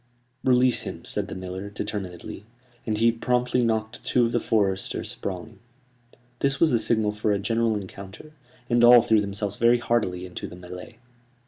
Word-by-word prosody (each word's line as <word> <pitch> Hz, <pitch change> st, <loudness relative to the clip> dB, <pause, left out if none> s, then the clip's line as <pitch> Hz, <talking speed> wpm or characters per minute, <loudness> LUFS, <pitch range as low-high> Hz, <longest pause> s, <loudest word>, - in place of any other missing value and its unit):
"Release 125 Hz, -1 st, +3 dB
him," -, -, -7 dB
said -, -, -2 dB
the -, -, -7 dB
miller, 95 Hz, +2 st, -6 dB
determinedly; 100 Hz, -3 st, -6 dB, 0.4 s
and 110 Hz, -1 st, 0 dB
he 115 Hz, +2 st, +4 dB
promptly 125 Hz, +1 st, 0 dB
knocked 110 Hz, 0 st, -1 dB
two 125 Hz, -1 st, +2 dB
of 115 Hz, -, -1 dB
the 120 Hz, -, +1 dB
foresters 100 Hz, -4 st, -1 dB
sprawling. 100 Hz, +4 st, -6 dB, 0.8 s
This 135 Hz, -1 st, 0 dB
was 165 Hz, -2 st, +4 dB
the 120 Hz, -, +3 dB
signal 110 Hz, -1 st, +1 dB
for 105 Hz, 0 st, -1 dB
a 100 Hz, -, +2 dB
general 115 Hz, +2 st, 0 dB
encounter, 100 Hz, +7 st, -9 dB, 0.4 s
and 120 Hz, -1 st, +3 dB
all 120 Hz, -1 st, +9 dB
threw 110 Hz, -2 st, +3 dB
themselves 100 Hz, 0 st, -3 dB
very 120 Hz, +1 st, +4 dB
heartily 110 Hz, -7 st, -1 dB
into 90 Hz, -, -7 dB
the -, -, -10 dB
mêlée. 90 Hz, +5 st, -10 dB
110 Hz, 165 wpm, -25 LUFS, 100-120 Hz, 0.8 s, all